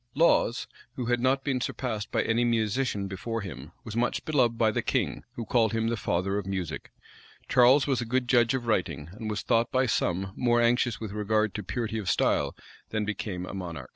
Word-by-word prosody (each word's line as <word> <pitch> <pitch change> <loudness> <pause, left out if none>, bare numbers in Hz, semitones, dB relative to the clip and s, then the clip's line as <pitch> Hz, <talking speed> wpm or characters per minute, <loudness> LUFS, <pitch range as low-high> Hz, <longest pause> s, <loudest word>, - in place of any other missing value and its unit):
Laws, 140 -6 +3 0.3
who 125 - -3
had 120 +1 +1
not 130 +2 +2
been 130 -3 -1
surpassed 110 -6 -3
by - - +1
any 115 +1 +1
musician 115 -2 0
before 115 +4 -4
him, 75 -7 -8
was 110 - -7
much 120 +1 0
beloved 125 -7 +2
by 110 -1 +3
the - - -1
king, - - -1
who 115 - -4
called 115 0 +2
him 115 0 +1
the 115 - 0
father 95 -1 -1
of 100 - -7
music. 95 -5 -4 0.6
Charles 130 +2 +5
was 135 -4 0
a - - -3
good 125 +2 0
judge 120 -1 +4
of 125 -2 -3
writing, 90 -8 -1
and 110 +3 -6
was 105 - -3
thought 115 -1 +2
by 130 +1 +2
some 95 -4 0
more 120 -1 +2
anxious 120 0 +2
with 110 -3 -5
regard 105 0 0
to 105 - -4
purity 110 +2 -3
of 100 - -3
style - - +1 0.3
than 110 -1 -1
became 100 -3 -4
a - - -8
monarch. 90 -4 -6
115 Hz, 205 wpm, -28 LUFS, 100-120 Hz, 0.6 s, Charles